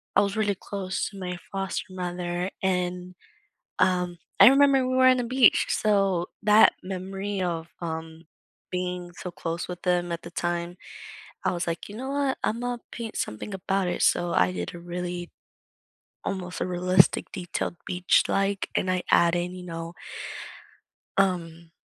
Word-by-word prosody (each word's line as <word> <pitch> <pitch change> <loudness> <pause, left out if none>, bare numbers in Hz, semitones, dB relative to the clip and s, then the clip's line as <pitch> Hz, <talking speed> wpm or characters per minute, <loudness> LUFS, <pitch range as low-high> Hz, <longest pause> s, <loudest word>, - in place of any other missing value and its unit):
I 200 - +7
was 200 +1 -1
really 205 -2 +1
close 190 -1 -3
to 200 - -12
my 180 -1 -4
foster 195 -1 -3
mother, 180 0 -3
and, 180 -1 -1 0.6
um, 180 -1 +2 0.2
I - - +11
remember 275 -1 +6
we 255 - 0
were 260 0 +6
on 255 0 +6
the 250 - 0
beach, 255 0 +5
so 195 -4 +2 0.2
that 210 +1 +7
memory 195 +1 -4
of, 170 -2 -2
um, 160 0 -5 0.5
being 180 -1 -3
so 180 - -7
close 170 0 -4
with 180 -1 -7
them 175 -1 +1
at 170 - -3
the 170 - -9
time, 175 0 -2 0.7
I - - +2
was 175 - -2
like, 170 +3 -3
"You 205 - -8
know 265 +2 -4
what? 280 -1 0
Imma 245 +2 -2
paint 230 -2 -6
something 110 - -4
about 195 0 0
it, 175 - -2
so 175 -1 +3
I 90 0 +4
did 90 -1 -4
a - - -8
really 175 0 -5 0.9
almost 185 -2 -4
a - - 0
realistic 180 0 +3
detailed 175 -2 -3
beach, 180 0 +3
like, 195 0 0
and 185 - +1
I 180 -1 0
add 170 0 +5
in, 175 +1 -1
you 180 - -8
know 165 -1 -6 1.2
um, 170 -4 0
180 Hz, 160 wpm, -26 LUFS, 175-195 Hz, 1.2 s, I